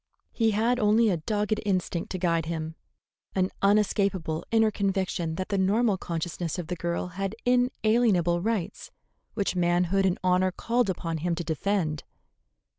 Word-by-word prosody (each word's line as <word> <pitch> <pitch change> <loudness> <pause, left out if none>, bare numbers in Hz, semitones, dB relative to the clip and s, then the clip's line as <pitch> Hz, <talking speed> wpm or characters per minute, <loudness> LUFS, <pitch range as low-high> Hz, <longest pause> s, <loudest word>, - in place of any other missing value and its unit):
He 225 -2 +1
had 230 +4 +1
only 215 0 +4
a 175 - +1
dogged 210 +6 -1
instinct 185 -4 -1
to 185 - -3
guide 165 -3 0
him, 160 -1 -4 0.6
an 185 0 +1
unescapable 195 -5 +1
inner 225 -1 +3
conviction 190 -5 -1
that 185 +2 -4
the 200 -2 0
normal 205 +3 +2
consciousness 170 0 -3
of 175 - -4
the 180 - -2
girl 170 +1 -3
had 195 +3 -4
inalienable 225 -8 +2
rights 215 -3 -3 0.5
which 200 -3 -1
manhood 180 +2 +2
and 180 - 0
honor 185 0 +3
called 235 +3 0
upon 165 -3 -2
him 170 +2 -1
to 175 - -4
defend. 160 -1 -1
185 Hz, 150 wpm, -27 LUFS, 170-210 Hz, 0.6 s, only